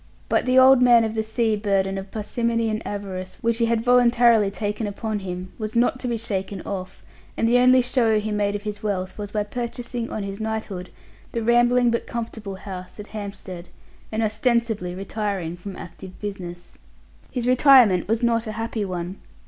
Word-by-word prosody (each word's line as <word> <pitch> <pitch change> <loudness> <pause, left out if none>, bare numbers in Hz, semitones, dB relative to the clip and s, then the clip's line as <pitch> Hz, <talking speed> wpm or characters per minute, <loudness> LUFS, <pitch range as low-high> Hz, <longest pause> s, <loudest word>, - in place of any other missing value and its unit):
But - - +2
the 255 +1 +3
old 260 0 +7
man 240 -2 +6
of 220 -1 -1
the 220 - 0
sea 220 0 0
burden 195 -2 0
of 195 0 -6
parsimony 230 +2 -1
and 215 +1 -2
avarice 190 -2 -5
which 230 -1 0
he 230 - +3
had 230 -1 +1
voluntarily 240 -3 +5
taken 210 +1 -3
upon 210 +1 -3
him 185 -1 -6
was 215 +1 -4
not 245 +2 +2
to 255 - -4
be 235 -1 -1
shaken 195 -3 -3
off, 190 -1 -6 0.3
and 225 - +2
the 245 +2 +4
only 255 0 +6
show 235 -3 +2
he 215 +1 -3
made 205 -1 0
of 205 - -5
his 210 -1 -5
wealth 195 -2 -3
was 205 -1 -5
by 210 -1 0
purchasing, 240 +1 -5
on 215 - -4
his 200 +1 -6
knighthood, 220 -4 -4 0.4
the 230 - -1
rambling 240 +1 +4
but 235 - -2
comfortable 220 -4 -5
house 190 0 -9
at 210 - -6
Hampstead, 200 -4 -7 0.4
and 220 +1 0
ostensibly 220 -5 0
retiring 195 -3 -3
from 185 +2 -8
active 180 +1 -10
business. 180 -4 -7 0.5
His 245 -2 -3
retirement 250 - +6
was 225 +3 0
not 230 -1 +2
a 215 - -4
happy 225 0 -3
one. 180 0 -4
215 Hz, 185 wpm, -23 LUFS, 195-235 Hz, 0.5 s, old